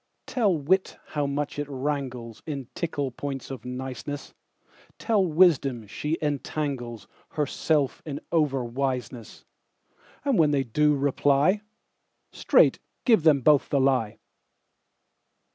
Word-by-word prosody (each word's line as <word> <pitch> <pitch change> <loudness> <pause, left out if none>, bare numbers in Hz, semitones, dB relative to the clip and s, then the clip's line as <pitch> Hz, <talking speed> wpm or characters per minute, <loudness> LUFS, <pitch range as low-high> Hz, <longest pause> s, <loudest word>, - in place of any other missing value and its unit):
Tell 225 -6 +1
wit 185 +7 +1
how 145 -2 -1
much 145 +1 -3
it 145 - -2
wranglesIn 135 -1 -4
tickle 145 -5 -2
points 135 +1 -6
of 130 - -8
niceness; 130 +3 -6 0.6
Tell 215 -4 +2
wisdom 150 -9 +3
she 150 +10 -3
entanglesHerself 140 - -2
in 145 -3 -5
over 145 -6 +1
wiseness:And 130 - -5
when 155 -2 +5
they 140 -2 +1
do 150 +5 +2
reply, 145 +6 +2 0.7
Straight - - +4 0.3
give 225 -7 +5
them 150 -3 +4
both 145 +2 +4
the 140 - +2
lie. 130 -5 +1
140 Hz, 105 wpm, -26 LUFS, 130-150 Hz, 0.7 s, when